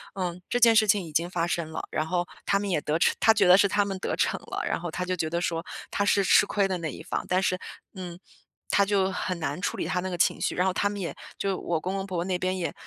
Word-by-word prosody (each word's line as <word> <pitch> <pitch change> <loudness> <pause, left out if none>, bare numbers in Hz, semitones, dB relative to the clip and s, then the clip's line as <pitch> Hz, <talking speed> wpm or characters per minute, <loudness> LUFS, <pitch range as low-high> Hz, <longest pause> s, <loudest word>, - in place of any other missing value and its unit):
“嗯， 180 -2 -3
这 - - +1
件 230 -1 +7
事 215 -1 +5
情 205 -2 +3
已 160 - -9
经 165 +3 0
发 175 -2 -1
生 170 -2 -2
了， - - -4
然 155 - -1
后 175 +1 0 0.2
他 200 - +2
们 200 0 -3
也 175 - +1
得 150 +2 0
逞，” - - +4
他 225 - +6
觉 205 -2 +3
得 180 +1 +8
是 200 0 +5
他 205 +1 +2
们 195 -1 -3
得 - - -2
逞 - - 0
了， - - -5
然 - - -1
后 175 +1 -4
他 180 - -3
就 185 - -1
觉 160 -1 -1
得 170 +1 -1
说， 165 -1 -2 0.3
他 205 - 0
是 200 -1 +3
吃 - - +5
亏 200 -2 +1
的 185 - -2
那 165 -2 -4
一 - - -9
方。 - - -3
但 185 +1 +2
是， 185 - +1 0.4
嗯， 180 -2 -7 0.5
他 200 - +4
就 195 -1 +2
很 180 -1 -3
难 160 +1 -3
处 - - -2
理 - - -2
他 180 - -1
那 185 - -3
个 175 - -4
情 - - +2
绪。 - - 0
然 180 +1 +2
后 185 - +1
他 205 - +1
们 205 0 -5
也 175 - -4 0.2
就 195 -1 -1
我 170 -2 -1
公 185 +4 -3
公 195 0 -3
婆 185 -3 -4
婆 170 - -1
那 185 -1 0
边 185 +1 -1
也， 175 - -2
185 Hz, 320 characters per minute, -27 LUFS, 170-195 Hz, 0.5 s, 得